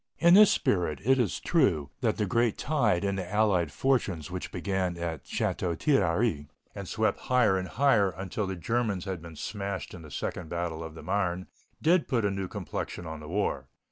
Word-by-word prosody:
In 170 Hz, +1 st, +6 dB
this 210 Hz, +1 st, +9 dB
spirit, 85 Hz, -7 st, +1 dB
it 135 Hz, +1 st, +4 dB
is 115 Hz, -7 st, 0 dB
true, 85 Hz, -, +2 dB
that 115 Hz, -4 st, 0 dB
the 105 Hz, -, +1 dB
great 115 Hz, +2 st, +1 dB
tide 120 Hz, -, +1 dB
in 100 Hz, -1 st, 0 dB
the 90 Hz, -2 st, -5 dB
allied 100 Hz, -7 st, +2 dB
fortunes 100 Hz, -, 0 dB
which 90 Hz, 0 st, -5 dB
began 90 Hz, -1 st, -1 dB
at 85 Hz, -4 st, -4 dB
Château 85 Hz, -3 st, -1 dB
Thierry 100 Hz, -, +2 dB, 0.3 s
and -, -, -7 dB
swept -, -, 0 dB
higher 125 Hz, -6 st, +4 dB
and 95 Hz, 0 st, -2 dB
higher 115 Hz, -3 st, +3 dB
until 95 Hz, +3 st, -4 dB
the 95 Hz, -, -3 dB
Germans 105 Hz, 0 st, -1 dB
had 95 Hz, -4 st, -4 dB
been 85 Hz, -1 st, -10 dB
smashed 100 Hz, +3 st, -4 dB
in 90 Hz, -, -9 dB
the 75 Hz, -, -11 dB
second 80 Hz, +4 st, -4 dB
battle 85 Hz, -2 st, -3 dB
of 80 Hz, -1 st, -8 dB
the -, -, -10 dB
Marne, 95 Hz, -2 st, -1 dB, 0.4 s
did 170 Hz, +1 st, +4 dB
put 115 Hz, -5 st, +1 dB
a 100 Hz, -, +1 dB
new 95 Hz, -1 st, -3 dB
complexion 90 Hz, -, -5 dB
on 80 Hz, -1 st, -6 dB
the 75 Hz, -, -10 dB
war. 100 Hz, +4 st, -1 dB
95 Hz, 195 wpm, -28 LUFS, 85-115 Hz, 0.4 s, this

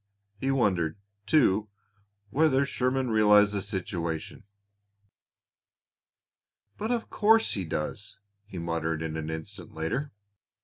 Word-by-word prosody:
He 135 Hz, -, -1 dB
wondered, 95 Hz, -12 st, +1 dB, 0.3 s
too, 110 Hz, -8 st, +3 dB, 0.6 s
whether 140 Hz, -1 st, +3 dB
Sherman 130 Hz, -1 st, 0 dB
realized 105 Hz, -1 st, +5 dB
the 100 Hz, -, -1 dB
situation. 90 Hz, -2 st, -4 dB, 2.3 s
"But 220 Hz, -, -4 dB
of 240 Hz, -2 st, -2 dB
course 225 Hz, +1 st, +4 dB
he 95 Hz, -3 st, -2 dB
does!" 90 Hz, +6 st, -4 dB, 0.3 s
he 95 Hz, -, -9 dB
muttered 80 Hz, -1 st, -2 dB
an 80 Hz, -1 st, -4 dB
instant 80 Hz, +2 st, -8 dB
later. 120 Hz, -, -2 dB
105 Hz, 100 wpm, -28 LUFS, 80-130 Hz, 2.3 s, realized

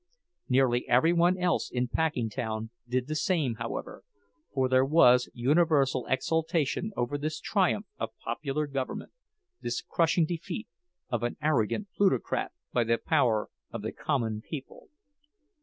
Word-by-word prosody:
Nearly 125 Hz, -2 st, +2 dB
every 145 Hz, +8 st, +5 dB
one 175 Hz, +2 st, +3 dB
else 180 Hz, -1 st, +1 dB
in 125 Hz, 0 st, -1 dB
Packingtown 115 Hz, -6 st, -2 dB, 0.2 s
did 125 Hz, 0 st, 0 dB
the 155 Hz, -, -4 dB
same, 155 Hz, -8 st, 0 dB
however, 115 Hz, 0 st, -5 dB, 0.5 s
for 130 Hz, -1 st, +1 dB
there 130 Hz, 0 st, +4 dB
was 125 Hz, -4 st, +5 dB
universal 135 Hz, -1 st, +2 dB
exultation 160 Hz, +6 st, 0 dB
over 130 Hz, +4 st, -1 dB
this 155 Hz, +1 st, -3 dB
triumph 200 Hz, +1 st, +1 dB
of -, -, -4 dB
popular 150 Hz, +1 st, -2 dB
government, 135 Hz, -2 st, -4 dB, 0.5 s
this 120 Hz, -, -3 dB
crushing 165 Hz, 0 st, +2 dB
defeat 175 Hz, +6 st, -5 dB, 0.4 s
of 120 Hz, -2 st, -1 dB
an 120 Hz, 0 st, -2 dB
arrogant 150 Hz, -, 0 dB
plutocrat 190 Hz, -, +1 dB, 0.2 s
by 120 Hz, -, +3 dB
the 115 Hz, +1 st, +2 dB
power 120 Hz, -9 st, +1 dB, 0.2 s
of -, -, -6 dB
the -, -, -2 dB
common 115 Hz, -7 st, -1 dB
people. 140 Hz, +2 st, -9 dB
135 Hz, 135 wpm, -29 LUFS, 120-165 Hz, 0.5 s, every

